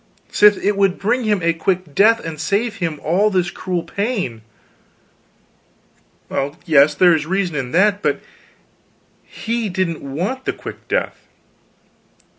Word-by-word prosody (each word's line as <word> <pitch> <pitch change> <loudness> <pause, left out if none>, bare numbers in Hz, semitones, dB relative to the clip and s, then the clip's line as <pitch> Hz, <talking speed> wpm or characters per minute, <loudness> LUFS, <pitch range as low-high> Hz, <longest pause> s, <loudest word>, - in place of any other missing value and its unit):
"Sith 210 -1 +5
it 205 0 +2
would 195 -2 +2
bring 240 +4 0
him 205 -4 +1
a 170 0 +2
quick 175 -1 -2
death 225 +7 +4
and 160 -2 -5
save 210 +4 -1
him 165 -6 -3
all 190 +7 +2
this 185 -3 0
cruel 180 -2 -3
pain." 200 - -3 1.9
"Well 140 +2 -3
yes, 150 -3 +5
there 180 +2 +5
is 155 -1 -1
reason 185 -2 -1
in 130 -3 -3
that. 205 +3 +3
But - - 0 1.0
he 230 -1 -4
didn't 180 -3 -2
want 180 - -4
the - - -1
quick - - -10
death." - - -2
185 Hz, 140 wpm, -19 LUFS, 160-210 Hz, 1.9 s, Sith